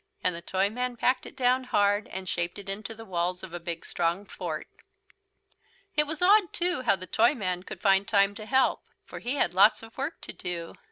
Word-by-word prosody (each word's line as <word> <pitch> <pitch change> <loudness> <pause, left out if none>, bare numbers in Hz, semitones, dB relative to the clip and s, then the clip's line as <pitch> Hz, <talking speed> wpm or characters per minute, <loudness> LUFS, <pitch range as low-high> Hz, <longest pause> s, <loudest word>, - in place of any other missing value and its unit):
And 180 -1 +1
the 170 - -7
Toyman 220 +8 -1
packed 255 +3 +1
it - - -12
down 255 0 +2
hard, 205 -2 +2
and 190 0 -6
shaped 170 +1 -2
it 200 -1 -9
into 210 +3 -3
the 225 +1 -10
walls 180 -1 -2
of 185 -3 -8
a 175 - -4
big 170 -1 -6
strong 175 +4 -1
fort. - - -5 1.3
It 300 -1 +3
was 315 +3 -3
odd, 400 -1 +5
too, 350 -3 0
how 250 - +3
the 185 -1 -8
Toyman 205 -5 +1
could - - -9
find 195 0 +4
time 200 -1 +3
to 215 +1 -9
help. 265 +1 +3 0.2
For - - -8
he 250 +4 -2
had 180 -10 +1
lots 205 +4 +5
of 225 0 -12
work 290 +5 -3
to - - -6
do. 170 -2 -5
205 Hz, 210 wpm, -28 LUFS, 180-250 Hz, 1.3 s, odd